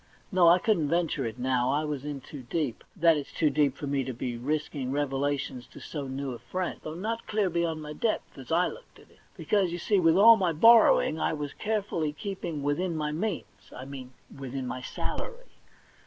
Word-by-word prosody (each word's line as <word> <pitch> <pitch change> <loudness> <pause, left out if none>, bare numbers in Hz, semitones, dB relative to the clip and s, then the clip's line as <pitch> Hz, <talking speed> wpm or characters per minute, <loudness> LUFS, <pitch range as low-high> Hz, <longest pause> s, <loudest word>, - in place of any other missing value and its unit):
No, 180 -3 +5
I 170 +1 +8
couldn't 175 -7 +1
venture 165 -6 0
it 115 - -7
now; 125 0 +1
I 150 +2 0
was 145 -3 -4
in 145 -2 -5
too 140 +1 -9
deep; 130 0 -3
that 165 -3 +4
is, 145 - -6
too 155 -3 +1
deep 145 -3 +2
for - - -5
me 140 -1 0
to 130 0 -4
be 120 0 -3
risking 140 +1 -2
revelations 140 -2 -2
to - - -13
so 145 -3 -6
new 135 0 -4
a 120 - -8
friend, 185 -1 -4
though 155 - -6
not 225 +6 -4
clear 210 -4 0
be 170 +1 0
yond 160 -2 -2
my 150 0 -6
depth, 220 +8 -2
as 135 +2 -10
I 175 +2 +4
looked - - -8
at - - -19
it. - - -24 0.2
Because, 195 -4 +1
you 175 - -3
see, 200 +3 +2
with 165 0 +4
all 225 +3 +9
my 180 -4 +1
borrowing, 220 -3 +6
I - - 0
was 145 -2 -4
carefully 200 -8 -2
keeping 170 -4 -5
within 165 +5 0
my 150 -1 -1
means 180 +3 -2 0.3
— - - -12
I 130 - -7
mean 130 -2 -9 0.2
within 135 -1 -5
my 125 +1 -4
salary. - - -6
150 Hz, 215 wpm, -28 LUFS, 135-180 Hz, 0.3 s, all